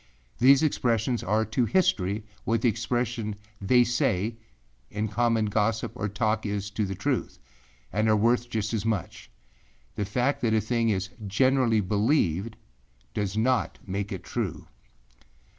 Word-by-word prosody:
These 135 +4 +6
expressions 120 -4 +1
are 110 +3 +1
to 115 +3 0
history 105 - +1 0.2
what 115 -1 0
the 120 - +5
expression 115 -1 -2 0.3
âthey 125 +5 +5
sayâ 115 -3 +1 0.5
in 105 +1 -2
common 115 0 +1
gossip 110 +2 0
or 100 - -3
talk 110 +3 0
is 100 -1 -3
to 105 0 -1
the 95 - -4
truth, - - -2 0.6
and 110 +3 +2
are 110 - +5
worth 120 +3 +2
just 110 -2 -2
as 110 -3 -1
much. 110 -6 -3 0.6
The 105 - -2
fact 125 +8 0
that 110 -2 +2
a - - +4
thing 115 +2 0
is 100 -1 -1 0.2
generally 125 0 +3
believed 105 - +1 0.6
does 105 -1 -2
not 125 +2 +1
make 100 +1 -3
it 95 - -5
true. - - -4
110 Hz, 145 wpm, -27 LUFS, 105-120 Hz, 0.6 s, These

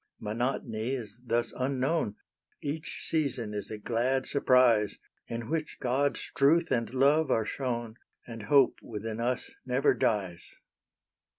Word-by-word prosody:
Monotony 115 +2 -2
is 115 -3 -7
thus 120 -1 0
unknown 130 -2 0 0.4
Each 155 +2 -5
season 135 -9 0
is 105 -1 -4
a 110 - -5
glad 125 +5 0
surprise, 125 -7 +3 0.3
In 115 -1 -5
which 155 +2 -3
God's 135 +3 0
truth 160 +4 +4
and 115 -3 0
love 140 +3 +3
are 110 -4 +2
shown, 120 -3 -3 0.3
And 115 -2 -8
hope 135 +5 +4
within 110 0 -5
us 125 +2 -1
never 130 +3 +2
dies. 100 -7 -1
125 Hz, 125 wpm, -29 LUFS, 110-135 Hz, 0.4 s, truth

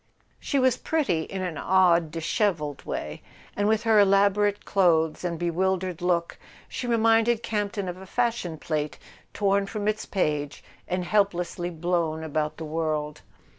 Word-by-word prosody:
She 280 - -1
was 260 -2 +3
pretty 195 - 0
in 190 -1 -5
an 175 -4 -4
odd 175 -3 +3
dishevelled 165 - -1
way, 75 0 -5 0.3
and 205 0 +1
with 220 +1 +2
her 220 -2 +4
elaborate 200 +1 +3
clothes 165 -5 +2
and 170 -2 -2
bewildered 180 +1 -1
look 175 -1 0 0.3
she 245 - -5
reminded 225 0 +3
Campton 205 -2 -2
of 180 0 -5
a 190 0 -11
fashion 230 -8 -1
plate 150 -1 -3 0.3
torn 200 -1 +1
from 210 0 -4
its 215 0 -1
page 150 -6 -1 0.2
and 180 0 -2
helplessly 180 -4 0
blown 165 -2 -1
about 155 0 -2
the 160 - -6
world. 155 -1 -2
180 Hz, 145 wpm, -26 LUFS, 160-205 Hz, 0.3 s, her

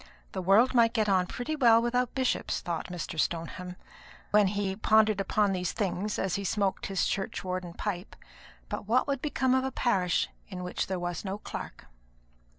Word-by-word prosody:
"The - - -3
world 200 +8 +5
might 230 -2 +4
get 215 -2 +2
on 185 -2 +3
pretty 295 - -3
well 235 -6 +6
without 240 +1 0
bishops," 260 -2 0
thought 170 -2 -3
Mr. 175 -3 -5
Stoneham, 175 +3 -2 0.6
when 210 -1 +5
he 195 -1 -1
pondered 215 -1 +3
upon 200 +1 +1
these 180 -1 -2
things 205 0 -2
as 190 -1 0
he 200 - -4
smoked 200 0 0
his 195 -2 0
churchwarden 185 -3 -3
pipe; 195 -2 -4 0.5
"but - - -5
what 245 +4 +3
would 275 -2 -1
become 265 -4 +1
of 260 0 +3
a 265 - -2
parish 190 -10 +1 0.2
in 180 -2 -6
which 180 - -2
there 190 - -2
was 175 -1 -3
no 195 0 -3
clerk?" - - -8
200 Hz, 175 wpm, -29 LUFS, 180-230 Hz, 0.6 s, well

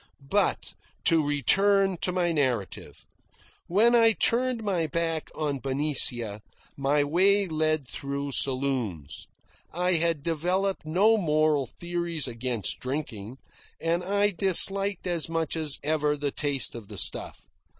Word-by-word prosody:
But 205 0 0 0.3
to 165 -2 +4
return 195 - +2
to 180 - -1
my 180 -1 0
narrative. 130 - -3 0.6
When 220 +7 +3
I 230 -1 +5
turned 240 +1 0
my 180 -6 -1
back 165 0 -2
on 145 -3 -2
Benicia, 130 -6 -1 0.3
my 140 +1 +1
way 195 +7 +2
led 155 -4 -1
through 140 +2 -5
saloons. 130 - -1 0.4
I 180 +2 0
had 165 -3 0
developed 180 +3 -1
no 205 +8 +3
moral 155 - +1
theories 170 -1 -2
against 120 -3 -3
drinking, 130 -4 -5 0.4
and 170 +2 -1
I 205 +2 +1
disliked 195 +1 +4
as 170 -3 -1
much 165 -1 -2
as 155 -3 -2
ever 150 0 0
the 145 -1 -2
taste 140 -3 -1
of 115 -4 -9
the 105 -1 -9
stuff. - - -2
155 Hz, 130 wpm, -26 LUFS, 140-185 Hz, 0.6 s, I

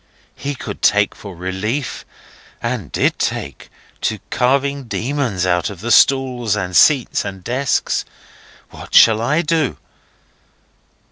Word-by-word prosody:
He 145 0 -4
could 105 -5 -7
take 105 0 +3
for 100 -3 -10
relief 95 - -4 0.5
(and - - -4
did - - 0
take) - - -3 0.3
to 110 - -1
carving 135 +2 +1
demons 120 -6 -2
out 90 -2 +1
of 100 -4 -9
the 115 +4 -3
stalls 125 -4 +3
and 90 -4 -3
seats 140 - +4
and 95 -2 -7
desks. 130 +6 0 0.7
What - - -8
shall 110 -1 +7
I 150 +8 +1
do? 160 -3 0
120 Hz, 125 wpm, -18 LUFS, 100-140 Hz, 0.7 s, shall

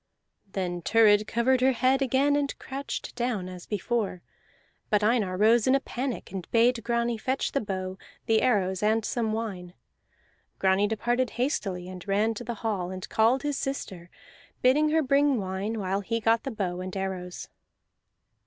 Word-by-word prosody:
Then 175 -2 -2
Thurid 210 +1 +4
covered 250 +2 +2
her 260 +1 +4
head 260 +3 +2
again 270 +2 +2
and 285 -1 -1
crouched 275 +1 -6
down 240 -6 -2
as 180 -1 -9
before. 210 -3 -2 0.7
But 210 0 +2
Einar 210 -5 +1
rose 220 +3 +4
in 260 - +5
a - - +3
panic 255 -4 -4
and 185 -3 -6
bade 230 0 +3
Grani 235 0 0
fetch 260 +4 -1
the 275 - 0
bow, 190 -2 -4 0.3
the 220 -1 +3
arrows, 190 -6 +1
and 215 +1 +2
some 230 -3 -1
wine. 195 -6 -4 0.8
Grani 190 +2 +3
departed 240 +4 0
hastily, 195 - -1
and 185 0 -9
ran 210 +3 +2
to 225 - -7
the 235 0 -4
hall, 190 -5 -1
and 185 -1 -6
called 235 +4 +3
his 290 -2 -1
sister, 190 -10 -5 0.5
bidding 295 +5 +4
her 315 +1 +2
bring 280 0 +3
wine 195 +3 -3
while 195 0 -1
he 230 +3 -2
got 225 0 +2
the - - -1
bow 185 -6 -3
and 185 +1 -5
arrows. 185 -2 -5
220 Hz, 165 wpm, -27 LUFS, 190-250 Hz, 0.8 s, in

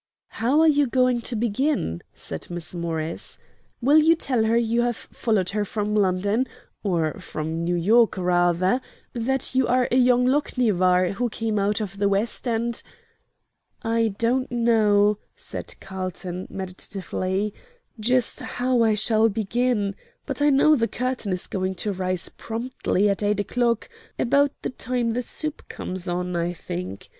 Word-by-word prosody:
"How 260 +7 +2
are 320 - +6
you 290 -2 +4
going 250 -1 +2
to 235 - -3
begin?" 230 - 0
said 80 - -6
Miss 175 -1 -6
Morris. 165 -2 -3 0.5
"Will 290 +5 +6
you 325 +2 +5
tell 255 -8 0
her 225 +1 +3
you 235 0 +2
have 240 -1 0
followed 200 -6 -1
her 210 +1 0
from 210 +1 -2
London 205 +5 +2 0.3
or 170 -6 0
from 160 +2 -4
New 175 +1 0
York, 220 +7 +4
rather 180 +4 +2 0.3
that 255 +3 -1
you 260 -1 +3
are 250 0 +3
young 250 0 +4
Lochinvar, 200 -10 +2
who 240 +5 -1
came 220 -1 -1
out 205 +2 +1
of 200 -1 -5
the 200 0 +3
West, 205 +5 0
and 235 0 -1 0.5
" - - -40 0.2
"I 225 -3 +1
don't 250 +3 +1
know," 210 -3 +3 0.2
said - - -7
Carlton, 185 -1 -5
meditatively, 190 +1 -3 0.5
"just 245 +2 +2
how 250 -1 0
I 220 -2 +4
shall 220 +1 +3
begin; 220 0 0 0.3
but - - -4
I 295 - +5
know 290 +2 +5
the 230 -4 +1
curtain 250 -5 -2
is 180 -1 -2
going 190 0 -2
to 200 +3 -2
rise 185 -1 -2
promptly 225 -3 -1
at 200 0 0
eight 205 0 +1
o'clock 235 +1 0 0.3
about 280 +3 +3
the - - -2
time 245 -2 -1
the 245 +2 -1
soup 305 +5 -4
comes 185 0 -4
on, 180 0 -2
I 170 +1 0
think. 95 - -6
215 Hz, 155 wpm, -24 LUFS, 185-245 Hz, 0.5 s, are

